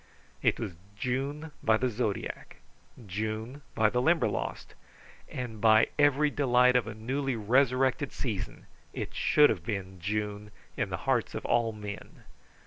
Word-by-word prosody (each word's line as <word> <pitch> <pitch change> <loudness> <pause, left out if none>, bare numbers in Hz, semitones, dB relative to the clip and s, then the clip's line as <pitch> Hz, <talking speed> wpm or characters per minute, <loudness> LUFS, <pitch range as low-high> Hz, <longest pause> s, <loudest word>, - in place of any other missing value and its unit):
It - - +2
was 105 -6 -4 0.2
June 140 +6 -2
by 110 0 +4
the 130 - 0
zodiac, 110 -3 -3 0.5
June 110 +7 -4
by 110 -1 +3
the 125 - +1
Limberlost, 155 - 0 0.6
and 115 -4 -6
by 110 0 +6
every 145 +1 +4
delight 125 -3 +4
of 120 -3 +2
a 105 - -6
newly 130 +4 -2
resurrected 130 +4 +2
season 110 -8 -4 0.3
it - - -5
should 150 0 +5
have 90 -7 -3
been 95 -3 -4
June 105 +2 -3 0.3
in - - -1
the - - -2
hearts - - +1
of - - -5
all 120 -1 +2
men. 105 -2 -9
115 Hz, 140 wpm, -29 LUFS, 105-130 Hz, 0.6 s, by